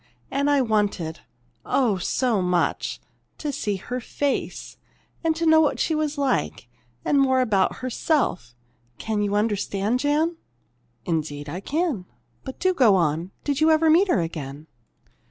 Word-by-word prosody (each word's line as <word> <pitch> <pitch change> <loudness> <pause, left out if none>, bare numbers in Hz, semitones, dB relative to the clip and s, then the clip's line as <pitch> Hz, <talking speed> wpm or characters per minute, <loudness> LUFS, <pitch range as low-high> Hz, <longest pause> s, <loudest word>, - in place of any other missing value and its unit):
And 280 +1 +1
I 285 -1 +4
wanted 205 -8 0 0.4
oh, 230 -8 +1
so 230 +2 0
much! 180 -1 0 0.4
to 300 - -3
see 210 -6 -2
her 245 +6 -5
face, 280 +3 -3 0.5
and 325 0 +1
know 315 0 +6
what 300 - +1
she 320 - +1
was 305 -1 -1
like, 255 - -1 0.4
and 280 - +3
more 260 -1 +3
about 215 -3 +1
herself. 250 - -1 0.4
Can 215 -2 -2
you 205 0 0
understand, 210 +1 0
Jan?" 305 +4 +1 0.7
"Indeed, 150 -3 -2
I 165 +5 -5
can. 285 - -1 0.4
But 265 - -7
do 370 0 +2
go 245 - +5
on. 165 0 0
Did 285 0 -1
you 315 - +5
ever 315 0 +4
meet 360 +5 +5
her 200 - +2
again?" 150 -3 -6
245 Hz, 145 wpm, -24 LUFS, 185-290 Hz, 0.7 s, know